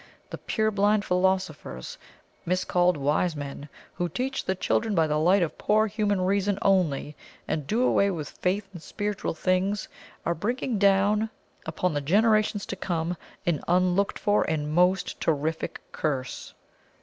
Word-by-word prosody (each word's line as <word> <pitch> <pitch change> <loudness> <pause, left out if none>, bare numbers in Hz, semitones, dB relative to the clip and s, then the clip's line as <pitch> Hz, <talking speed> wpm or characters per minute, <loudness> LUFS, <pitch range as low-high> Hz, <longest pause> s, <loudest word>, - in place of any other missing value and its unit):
The - - -6
purblind 210 -1 +1
philosophers, 180 - -1 0.4
miscalled 180 -1 +1
wise 150 +4 +1
men, 145 0 -7 0.2
who 175 0 -2
teach 260 +9 -2
the 190 - -1
children 215 +3 0
by 165 -2 +4
the 150 0 0
light 180 +4 +4
of 165 - -4
poor 215 +1 +3
human 205 -2 0
reason 195 +1 +1
only, 160 -7 +1 0.3
and 150 -3 -2
do 230 +8 +1
away 200 -5 +3
with 160 -7 -4
faith 195 +2 -2
in 175 - -8
spiritual 205 +4 -3
things, 185 +3 0 0.4
are 170 - +1
bringing 230 - -2
down 200 +2 +3 0.4
upon 170 +2 -1
the 145 - -1
generations 210 +5 +2
to - - -5
come 175 -2 -2 0.3
an 170 -4 +1
unlooked 180 +2 +2
for 205 0 +2
and 150 -1 -1
most 180 +3 +2
terrific 160 +1 -1
curse. 135 -5 -3
185 Hz, 145 wpm, -26 LUFS, 160-205 Hz, 0.4 s, by